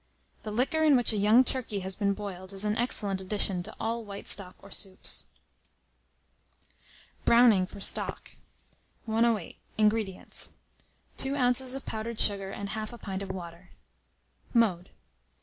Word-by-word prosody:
The 215 - -7
liquor 255 +9 0
in 305 -3 +5
which 240 -2 +2
a - - -1
young 215 +5 +5
turkey 235 -6 -2
has 190 0 -4
been 200 -1 0
boiled, 190 -2 -6
is 195 +2 -1
an 210 0 0
excellent 205 -5 +1
addition 190 -1 +4
to 200 +5 -8
all 230 +1 -2
white 200 -1 -9
stock 185 -3 +3
or 200 - -16
soups. 190 -1 -1 2.0
BROWNING 230 -6 +5
FOR 200 - -11
STOCK. - - -2 0.7
108. 225 -4 0 0.2
INGREDIENTS. 215 -3 0 0.7
2 270 +1 +1
oz. 255 0 +1
of 270 - -7
powdered 220 +1 -5
sugar, 195 -2 +3
and 200 +1 -6
1/2 215 +2 -4
a - - -9
pint 195 -3 -5
of 195 - -6
water. 175 -1 -8 0.9
Mode. 195 -6 +2
210 Hz, 145 wpm, -28 LUFS, 195-235 Hz, 2.0 s, in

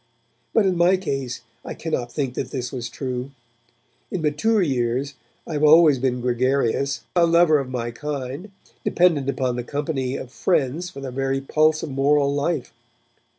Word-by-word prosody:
But 225 - +3
in 185 -2 +1
my 175 +2 +4
case 135 -8 -4 0.2
I - - -6
cannot 125 -7 -3
think 135 -3 -2
that - - -4
this 125 -2 -4
was 120 -3 -5
true. 130 +1 -4 0.8
In 175 - -3
mature 200 +8 +2
years 130 -1 -1 0.3
I - - -6
have 150 0 -1
always 155 -2 +7
been 125 -1 0
gregarious, 130 +2 0
a 170 -1 +5
lover 165 -2 +5
of 135 -2 -4
my 120 -2 -3
kind, 140 - -5 0.3
dependent 160 -6 +2
upon 130 -3 -1
the 120 - -3
company 140 -1 -2
of 125 - -8
friends 160 +2 0
for 140 -6 -10
the 135 -1 -5
very 135 +1 -1
pulse 155 +3 +2
of 150 - -4
moral 140 +1 +2
life. 145 0 -2
140 Hz, 165 wpm, -23 LUFS, 130-155 Hz, 0.8 s, always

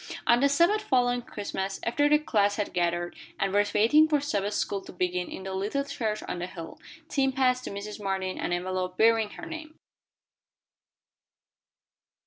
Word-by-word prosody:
On 235 - +5
the 280 +2 +4
Sabbath 340 +9 +3
following 245 -8 +2
Christmas, 200 -4 -4
after 290 +5 +2
the 300 - +6
class 205 -9 +1
had 210 -1 -3
gathered, 175 0 0 0.2
and 195 -1 0
were 205 0 +5
waiting 265 +9 +6
for 300 -2 +2
Sabbath 205 -8 -1
school 200 -1 -1
to - - -9
begin 180 0 -1
in 190 - -7
the 190 0 -5
little 210 +9 -1
church 230 -7 -3
on 175 - -3
the 175 - -3
hill, 165 -3 -9 0.3
Tim 270 -1 +1
passed 255 -1 +1
to - - -4
Mrs. 205 +1 -6
Martin 190 -1 -2
an - - -2
envelope 185 +1 -2
bearing 225 -1 +4
her - - -9
name. 320 -1 -8
210 Hz, 170 wpm, -28 LUFS, 190-270 Hz, 0.3 s, the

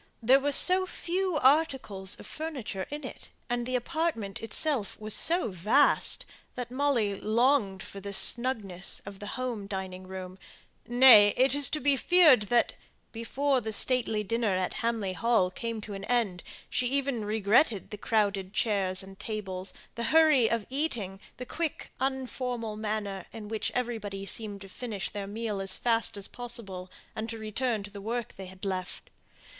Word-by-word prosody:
There 260 +4 +6
were 285 +1 -1
so 370 +6 +6
few 365 -1 -2
articles 265 - +2
of - - -10
furniture 265 -12 -5
in 295 -1 -6
it, - - -7 0.2
and 240 0 -1
the 255 - -1
apartment 250 -7 -2
itself 225 0 -1
was 215 0 -3
so 345 -6 +3
vast, 210 +11 +3 0.3
that 245 -1 -5
Molly 255 -6 +1
longed 220 -3 +1
for 200 - -9
the 200 +1 -6
snugness 205 -4 +2
of 200 -1 -9
the 205 - -7
home 240 -6 -4
dining 190 -2 -6
room; 185 0 -8 0.5
nay, 240 -4 +7
it 260 +2 +3
is 285 -2 +5
to 305 - -1
be 285 +1 +3
feared 315 -5 +6
that, 240 -1 +2 0.4
before 260 +4 0
the 220 - -4
stately 220 -1 +1
dinner 220 -1 0
at 185 0 -1
Hamley 225 -5 -1
Hall 220 -3 +2
came 230 +3 -4
to 205 0 -8
an 195 0 -6
end, 225 -7 0 0.3
she 250 0 0
even 270 -3 -1
regretted 210 +2 +2
the 210 - -5
crowded 200 -4 0
chairs 195 -4 0
and 195 0 -13
tables, 195 -3 -4 0.2
the 235 - -4
hurry 305 -4 +5
of 230 -3 -1
eating, 240 -10 -2 0.2
the 250 - -6
quick 320 +3 -4
unformal 250 -4 -3
manner 210 -3 -4
in 215 -2 -9
which 220 -1 -2
everybody 215 -5 -3
seemed 205 0 -3
to 195 - -9
finish 210 0 -5
their 200 -1 -5
meal 210 -1 -3
as 195 -1 -1
fast 230 -2 +1
as 200 - -3
possible, 225 -7 -6 0.3
and 220 +1 -4
to 225 - -4
return 220 0 -2
to 205 - -10
the 200 -1 -9
work 230 +2 -4
they 190 -1 -8
had 190 +2 -10
left. 185 -2 -5
225 Hz, 165 wpm, -28 LUFS, 200-255 Hz, 0.5 s, nay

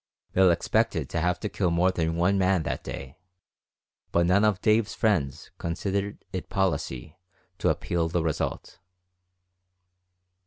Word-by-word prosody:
Bill 95 0 +5
expected 85 - +1
to 85 - 0
have 90 +2 0
to 105 - -1
kill 95 -3 0
more 85 +2 +3
than 80 -2 -1
one 90 +4 +2
man 95 -2 +2
that 85 - -3
day, 70 +2 -7 0.9
but 85 0 +3
none 95 +4 +4
of 105 -3 +3
Dave's 110 0 +2
friends 80 - 0
considered 100 +4 -3
it 95 - -4
policy 80 -6 -1 0.4
to - - +2
appeal 85 -1 0
the 85 0 0
result. 80 -2 -3
90 Hz, 140 wpm, -27 LUFS, 85-100 Hz, 0.9 s, Bill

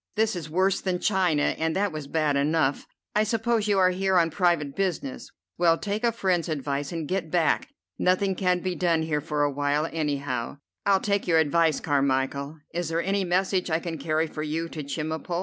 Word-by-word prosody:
This 220 -1 +1
is 165 -3 -6
worse 190 +4 +1
than 185 -2 -1
China, 180 -6 +2
and 160 0 0
that 200 0 +1
was 155 -2 -6
bad 150 -1 +1
enough. 145 0 +1 0.3
I 210 - +4
suppose 225 0 0
you 205 -1 +2
are 185 -1 +5
here 190 0 +1
on 165 -2 +3
private 165 -5 +1
business. 180 -9 -3 0.3
Well, 165 -1 +4
take 210 +4 -3
a 235 - +3
friend's 185 -7 0
advice 140 -1 -2
and 165 -3 -4
get 185 -2 -2
back. 165 -1 +1 0.3
Nothing 190 +2 +2
can 180 -1 +1
be 185 0 -1
done 170 -2 +1
here 150 -2 -1
for 150 0 -1
a 145 - +1
while, 145 +2 0
any 150 -3 0
how." 130 -2 -4 0.3
"I'll 195 -1 +4
take 200 -2 0
your 165 -2 +4
advice, 160 0 +3
Carmichel. 140 +1 0 0.2
Is 170 -1 -2
there 165 +1 0
any 195 +1 0
message 185 +1 0
I 160 - +2
can 165 -1 -5
carry 155 +2 0
for 155 -1 -6
you 155 +2 -2
to 155 - -6
Chemulpo?" 160 +4 -3
165 Hz, 200 wpm, -26 LUFS, 150-185 Hz, 0.3 s, are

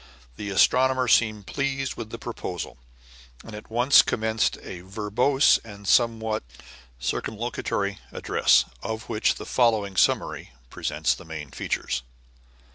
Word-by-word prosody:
The 100 - -6
astronomer 130 +5 +3
seemed 110 -3 +3
pleased 135 0 -2
with 115 -2 -7
the 115 - -6
proposal, 95 - -6 0.6
and 110 - -11
at 105 - -10
once 125 +5 +6
commenced 110 0 0
a 85 - -8
verbose 110 +8 +2
and 100 -2 -11
somewhat 110 -2 +2 0.6
circumlocutory 105 - -2
address, - - +3 0.2
of 110 0 -5
which 110 -2 +1
the - - -8
following 110 -6 +1
summary - - +1 0.2
presents - - 0
the - - -10
main 75 -4 -8
features. 65 -2 -2
110 Hz, 120 wpm, -25 LUFS, 100-120 Hz, 0.6 s, once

